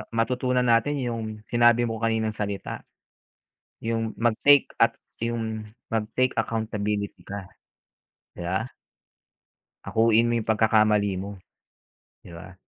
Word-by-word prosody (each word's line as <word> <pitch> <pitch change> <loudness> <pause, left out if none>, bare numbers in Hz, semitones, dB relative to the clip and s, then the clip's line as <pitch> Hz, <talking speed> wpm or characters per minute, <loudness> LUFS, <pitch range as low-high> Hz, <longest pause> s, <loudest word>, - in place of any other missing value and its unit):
matutunan 125 +2 +1
natin 135 +5 +3
yung 115 -2 -3 0.2
sinabi 120 0 +4
mo 115 - -3
kaninang 110 -1 0
salita. 100 -1 -4 1.0
Yung 115 -1 -2
mag-take 120 +5 +4
at - - +4 0.3
yung 110 -2 -3 0.2
mag-take 115 +3 0
accountability 105 -2 -2
ka. 100 -2 -6 0.9
Di 85 - -7
ba? 95 +5 -1 1.2
Akuin 115 +1 +3
mo - - +1
yung 110 - -3
pagkakamali 105 -3 +3
mo. 100 0 -7 0.8
Di 85 - -12
ba? 90 +2 -11
110 Hz, 110 wpm, -25 LUFS, 105-115 Hz, 1.2 s, sinabi